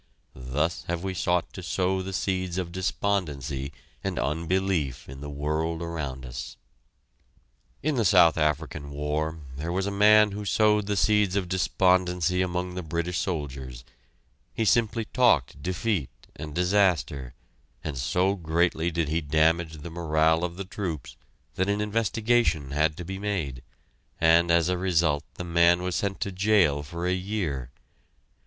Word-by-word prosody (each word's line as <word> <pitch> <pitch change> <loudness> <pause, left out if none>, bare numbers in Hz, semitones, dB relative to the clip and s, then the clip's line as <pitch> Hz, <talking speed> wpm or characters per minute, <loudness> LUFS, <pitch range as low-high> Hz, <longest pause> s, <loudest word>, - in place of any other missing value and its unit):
Thus 70 +6 -2
have 85 0 -2
we 95 -1 -2
sought 90 -1 0
to 95 - -7
sow 95 +1 0
the 95 +1 -5
seeds 95 -2 -2
of 90 -2 -3
despondency 75 -8 -2 0.3
and 95 -2 -2
unbelief 80 -2 -1
in 65 +1 -10
the 75 - -6
world 75 +3 -2
around 70 -6 -5
us. - - -7 1.3
In 155 +2 +1
the 115 - +2
South 90 -5 +6
African 75 -1 -1
War, 75 +2 -2 0.2
there 80 +4 -3
was 95 +2 -1
a 100 - -2
man 105 +1 +6
who 105 +1 -5
sowed 105 0 +2
the 105 -1 0
seeds 105 -2 +3
of 100 -3 0
despondency 90 -1 +2
among 90 0 -2
the 90 - -4
British 85 +2 -2
soldiers; 65 -8 -4 0.7
he 115 - 0
simply 115 +1 +2
talked 105 - +2
defeat 90 - -1 0.3
and 75 0 -7
disaster, 90 -9 +1 0.5
and 75 -3 -4
so 90 +9 +1
greatly 85 -1 0
did 85 -2 -1
he 80 +3 0
damage 80 +2 +2
the 85 - -7
morale 80 0 +2
of 85 -1 -2
the 100 - -5
troops 90 - -5 0.4
that 95 +2 0
an 100 +1 +1
investigation 105 - +1
had 75 +2 +1
to 90 - -6
be 95 +2 -5
made, 85 -12 -3 0.6
and 85 +1 +5
as 85 0 +4
a 90 -1 0
result 85 -5 +2
the - - -5
man 85 +1 +3
was 90 0 -2
sent 100 -1 -1
to 100 - -1
jail 95 -7 +3
for 85 +4 -6
a 90 - +2
year. 90 - -3
85 Hz, 155 wpm, -26 LUFS, 75-95 Hz, 1.3 s, South